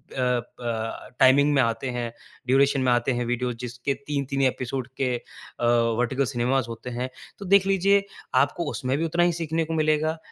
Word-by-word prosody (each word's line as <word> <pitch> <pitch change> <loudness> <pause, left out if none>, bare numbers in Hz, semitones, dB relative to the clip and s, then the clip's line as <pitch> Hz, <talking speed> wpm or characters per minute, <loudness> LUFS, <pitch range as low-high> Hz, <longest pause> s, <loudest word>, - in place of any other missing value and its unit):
ब 120 -2 -3
टाइमिंग 140 +3 +6
में 135 - +4
आते 115 +2 -1
हैं, 120 -1 -3 0.4
ड्यूरेशन 135 +1 +3
में 130 -1 +2
आते 120 +2 +2
हैं 120 - -1
वीडियोज़, 120 0 -1
जिसके 125 +3 -3
तीन-तीन 140 -1 -1
एपिसोड 130 0 -4
के 130 -2 +1
अ, 120 0 -8 0.3
वर्टिकल 130 +3 +1
सिनेमाज़ 125 +2 +1
होते 115 +2 -7
हैं। 130 +1 -2 0.3
तो 200 - -7
देख 195 +1 +5
लीजिए, 195 +1 +3 0.4
आपको 170 -4 -3
उसमें 130 +1 -1
भी 165 - 0
उतना 170 +2 +1
ही 175 - +3
सीखने 165 +1 0
को 165 - -4
मिलेगा, 155 +1 +1
130 Hz, 175 wpm, -25 LUFS, 120-155 Hz, 0.4 s, टाइमिंग